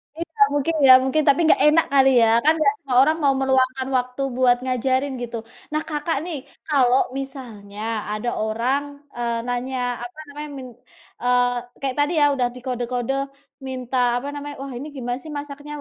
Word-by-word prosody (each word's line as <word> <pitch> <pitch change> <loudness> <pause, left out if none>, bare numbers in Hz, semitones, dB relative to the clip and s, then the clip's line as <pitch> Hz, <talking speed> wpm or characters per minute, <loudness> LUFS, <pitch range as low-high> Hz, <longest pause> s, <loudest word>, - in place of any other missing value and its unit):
Iya 330 -3 -7
mungkin 290 +3 0
ya, 255 - +10
mungkin 295 +4 +1
tapi 280 +3 +5
nggak - - +4
enak 320 +2 +4
kali 270 -1 +6
ya, 225 - +5 0.2
kan 310 - +6
gak 420 - +4
semua 260 -3 -3
orang 310 +3 +2
mau 275 -1 +4
meluangkan 265 0 +1
waktu 250 +2 -3 0.2
buat 245 -1 +4
ngajarin 260 +2 0
gitu. 235 -1 -4 0.4
Nah 305 - +1
Kakak 300 0 -1
nih 335 -5 -4 0.3
kalau 265 -4 +4 0.2
misalnya 225 -7 -8 0.3
ada 215 +3 -2
orang, 235 +6 0 0.3
eee, 235 -1 -1
nanya 250 +1 -3 0.3
apa 245 +6 -9
namanya 295 +1 -7
min 260 -1 -8 0.5
eee, 245 0 +3 0.3
kayak 265 -2 -2
tadi 295 +4 +2
ya, - - +6
udah 250 -3 +1
di - - -8
kode-kode 245 0 -2 0.5
minta 255 0 -4 0.2
apa 280 - -6
namanya, 290 0 -6
"Wah 275 -1 -6
ini 285 +4 -6
gimana 245 -1 -3
sih 310 - -9
masaknya? 290 +1 -7
265 Hz, 175 wpm, -22 LUFS, 245-290 Hz, 0.5 s, ya